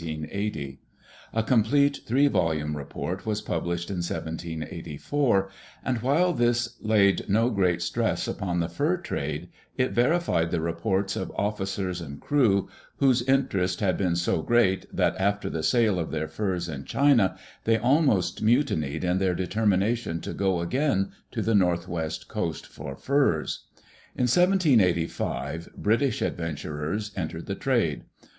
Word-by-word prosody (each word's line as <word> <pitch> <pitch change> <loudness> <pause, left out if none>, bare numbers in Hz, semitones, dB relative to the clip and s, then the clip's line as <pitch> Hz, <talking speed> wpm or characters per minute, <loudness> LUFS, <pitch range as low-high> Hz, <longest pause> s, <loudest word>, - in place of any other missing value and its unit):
A 115 - 0
complete 140 +5 +3
three 135 +5 +4
volume 80 - 0
report 85 +6 -5
was 105 -1 0
published 85 -1 -3
in 95 - -3
1784, 85 - -2 0.4
and 125 -3 0
while 160 +8 +3
this 120 -2 +1
laid 105 -2 +3
no 115 +5 +3
great 90 -4 +1
stress 85 - -1
upon 90 -2 -2
the 85 - 0
fur 150 - 0
trade, 75 - -4 0.3
it 130 -1 +1
verified 120 - +2
the 85 - 0
reports 95 +4 -1
of 95 - -4
officers 95 -3 -2
and 70 -3 -8
crew, 115 -10 +2 0.3
whose 130 -3 +4
interest 120 -8 +1
had 95 -5 +1
been 90 -3 0
so 85 -1 0
great 95 0 +2
that - - +1
after 100 +1 0
the 80 - -2
sale 100 +4 +2
of 80 - -2
their 80 0 -2
furs 90 0 -2
in 70 -4 -5
China 135 - +3 0.3
they 115 0 +4
almost 125 - +2
mutinied 110 - +1
in 90 +1 +1
their 95 -2 +1
determination 100 +1 0
to - - -6
go 95 -3 0
again 125 - 0 0.2
to - - -3
the 115 - +1
Northwest 85 -4 0
Coast - - -3
for 70 -1 -8
furs. 135 - 0 0.5
In - - 0
1785 110 - +2
British 115 +6 +1
adventurers 80 +5 -3
entered 80 -2 -4
the 100 - -3
trade. 115 - 0
95 Hz, 135 wpm, -26 LUFS, 85-120 Hz, 0.5 s, three